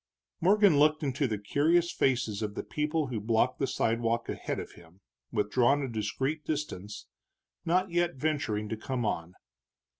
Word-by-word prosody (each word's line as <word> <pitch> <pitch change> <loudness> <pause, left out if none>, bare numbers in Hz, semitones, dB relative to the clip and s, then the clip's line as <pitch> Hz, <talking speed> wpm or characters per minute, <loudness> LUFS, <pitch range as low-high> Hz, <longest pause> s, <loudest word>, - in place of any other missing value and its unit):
Morgan 195 -3 +5
looked 155 +1 +4
into 140 0 0
the 110 -3 -2
curious 160 - +2
faces 115 -5 0
of 105 -1 -3
the - - -3
people 150 +6 -1
who 115 -4 -2
blocked 115 +3 +1
the 135 - +1
sidewalk 115 -1 0
ahead - - -3
of - - -7
him, 85 +3 -18 0.3
withdrawn 120 +6 +2
a - - -2
discreet 130 +7 -2
distance, 105 -10 -4 0.6
not 185 +2 +1
yet 175 -1 +1
venturing 130 -8 -1
to - - -2
come 120 +2 -3
on. 85 -3 -3
130 Hz, 155 wpm, -29 LUFS, 105-155 Hz, 0.6 s, Morgan